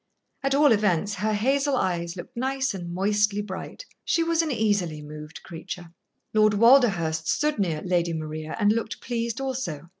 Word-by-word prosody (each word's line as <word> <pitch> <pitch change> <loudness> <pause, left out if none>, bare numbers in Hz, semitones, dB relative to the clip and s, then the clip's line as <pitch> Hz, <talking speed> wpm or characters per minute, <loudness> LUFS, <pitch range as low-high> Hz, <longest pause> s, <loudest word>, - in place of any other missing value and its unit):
At 275 0 +1
all 290 -1 +5
events, 205 -2 +2
her 210 +3 -1
hazel 275 +6 +1
eyes 170 -5 -1
looked 185 +8 -9
nice 265 +1 -1
and 175 -3 -6
moistly 205 +2 +1
bright. 205 - -7 0.2
She 335 - +1
was 335 0 +2
an 325 - -2
easily 205 - 0
moved 150 +1 -10
creature. 175 0 -8 0.4
Lord 215 -1 +4
Walderhurst 200 -10 +4
stood 300 -5 +1
near 165 -6 -1
Lady 175 -2 +1
Maria 155 0 -5
and 205 -1 +4
looked 225 0 -2
pleased 235 0 -3
also. 220 - -4
205 Hz, 160 wpm, -25 LUFS, 170-255 Hz, 0.4 s, all